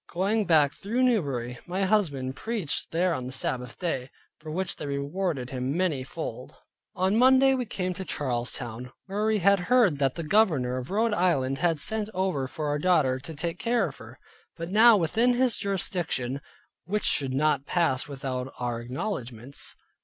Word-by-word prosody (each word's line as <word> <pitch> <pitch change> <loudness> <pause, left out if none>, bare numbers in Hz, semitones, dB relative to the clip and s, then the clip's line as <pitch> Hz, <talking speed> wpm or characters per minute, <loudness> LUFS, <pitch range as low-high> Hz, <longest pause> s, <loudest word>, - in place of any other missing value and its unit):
Going 205 +4 +1
back 150 -5 +4
through 235 +6 -1
Newbury 135 - 0
my 185 +2 -1
husband 150 -11 +1
preached 215 - -2
there 175 +2 +1
on 125 -4 -4
the - - -6
Sabbath 125 -2 -3
day; 135 -7 -2 0.3
for 155 - -9
which 185 +4 -3
they 150 - -5
rewarded 140 -1 -2
him 130 +3 -2
many 165 -8 0
fold. 130 - -7 0.4
On 190 +3 +1
Monday 265 +1 +6
we 250 -3 -1
came 185 -3 -2
to 190 - -6
Charlestown, 125 -4 -3
where 205 +2 -1
we 220 -1 +3
heard 200 - +3
that 135 -2 +1
the 170 - -4
governor 150 - +2
of 130 +1 -5
Rhode 220 +3 +1
Island 135 -9 +1
had 165 0 +2
sent 215 +5 0
over 185 -8 0
for 150 +3 -4
our 145 0 0
daughter, 145 -7 +3
to 155 +4 -9
take 165 +3 -4
care 240 +1 +1
of - - -13
her, - - -12 0.4
being 165 +1 -5
now 220 +2 +7
within 225 +8 +2
his 250 -2 +2
jurisdiction; 165 -9 -2 0.4
which 205 +4 -1
should 135 -3 +1
not 145 -1 +1
pass 165 -8 +1
without 130 -2 -4
our 120 -1 -3
acknowledgments. 125 - -5
165 Hz, 170 wpm, -27 LUFS, 130-200 Hz, 0.4 s, now